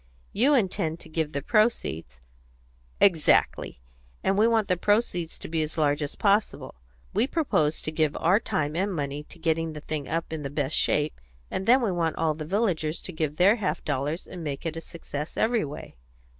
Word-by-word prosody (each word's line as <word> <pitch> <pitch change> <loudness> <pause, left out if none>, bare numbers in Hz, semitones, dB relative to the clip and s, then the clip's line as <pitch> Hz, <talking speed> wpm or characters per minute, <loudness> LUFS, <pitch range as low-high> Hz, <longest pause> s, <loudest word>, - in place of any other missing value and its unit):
You 270 +7 +4
intend 175 - 0
to - - -12
give 155 -1 -1
the 140 -1 -3
proceeds 85 - 0 0.4
" - - -33
"Exactly. 160 - +1 0.4
And 195 - +2
we 215 +3 +4
want 225 -3 +2
the 180 - +2
proceeds 180 -4 0
to - - -8
be 160 0 -1
as 155 +1 -4
large 145 -1 +2
as 145 - -3
possible. 205 +1 +1 0.4
We 220 +6 +2
propose 210 - +1
to 155 - -2
give 155 -1 0
our 180 +6 +4
time 155 -10 -2
and 195 +4 0
money 145 -1 -3
to - - -13
getting 165 -1 0
the 150 - -7
thing 150 -2 -4
up 165 0 -2
in 160 - -3
the 140 - -4
best 145 0 -2
shape, 150 - +1 0.3
and 190 - -3
then 250 +2 +6
we 215 - +1
want 170 -2 0
all 160 -1 +1
the 155 0 -6
villagers 175 -4 0
to 180 - -6
give 155 -2 -2
their 195 +7 +5
half 205 -4 -2
dollars 145 +4 -2
and 175 -2 -8
make 145 +1 -4
it 165 -1 -2
a 165 - -5
success 155 -2 -7
every 230 0 +2
way." 145 - -9
160 Hz, 200 wpm, -26 LUFS, 150-195 Hz, 0.4 s, then